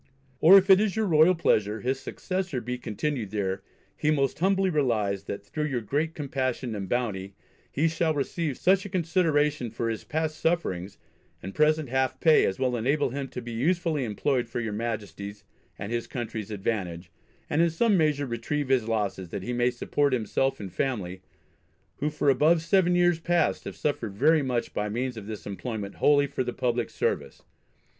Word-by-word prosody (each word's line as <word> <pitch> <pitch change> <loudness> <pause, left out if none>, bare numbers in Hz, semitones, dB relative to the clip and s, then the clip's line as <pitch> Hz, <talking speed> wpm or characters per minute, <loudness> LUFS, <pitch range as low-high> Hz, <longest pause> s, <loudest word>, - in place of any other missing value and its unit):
Or 185 +5 +9
if 190 0 +4
it 190 +1 +7
is 215 -2 0
your 220 -1 +1
royal 165 0 +5
pleasure 110 -9 +1
his 130 +2 -1
successor 185 +1 -3
be 125 +1 -4
continued 120 0 -3
there, 95 -2 -2 0.3
he 150 - 0
most 140 -3 +1
humbly 190 +1 +2
relies, 110 - 0
that 100 - -6
through 155 -1 -3
your 130 -5 -2
great 150 +9 -1
compassion 130 -4 -2
and 100 -3 -5
bounty 100 -6 -2 0.4
he 155 +4 +2
shall 165 0 +1
receive 145 0 -2
such 190 +1 +3
a 200 - -7
consideration 155 - +1
for 115 +1 -2
his 110 - -5
past 155 0 -2
sufferings 100 - -1 0.5
and 95 +2 -6
present 155 -2 +2
half 130 0 0
pay 160 -2 +5
as 95 - -2
will 130 -1 0
enable 135 +4 +1
him 140 +1 -4
to 125 - -7
be 120 - -7
usefully 155 +4 0
employed 120 +2 -1
for 120 - -3
your 110 -3 -3
Majesty's 105 -2 -5 0.3
and 100 +3 -6
his 120 -1 -2
country's 110 -4 -5
advantage, 95 -5 -3 0.4
and 150 - +1
in 170 - +4
some 210 +6 +2
measure 150 -4 +2
retrieve 130 +4 -3
his 125 -4 +2
losses, 100 -5 -2
that 95 - -5
he 125 - -3
may 120 0 +2
support 140 +3 0
himself 130 +3 0
and 95 -4 -7
family, 95 -7 -2 0.8
who 150 - 0
for 150 -1 -2
above 160 +5 +3
seven 180 +1 +3
years 175 -1 +3
past 170 -1 +1
have - - -6
suffered 115 -9 -2
very 155 +7 +4
much 125 -3 -2
by 105 0 -2
means 125 +3 -2
of 105 -2 -8
this 110 -2 -7
employment 105 0 -5
wholly 145 -1 +4
for 140 -2 -2
the 125 -1 -4
public 120 -1 -1
service. - - -2
130 Hz, 185 wpm, -27 LUFS, 110-155 Hz, 0.8 s, Or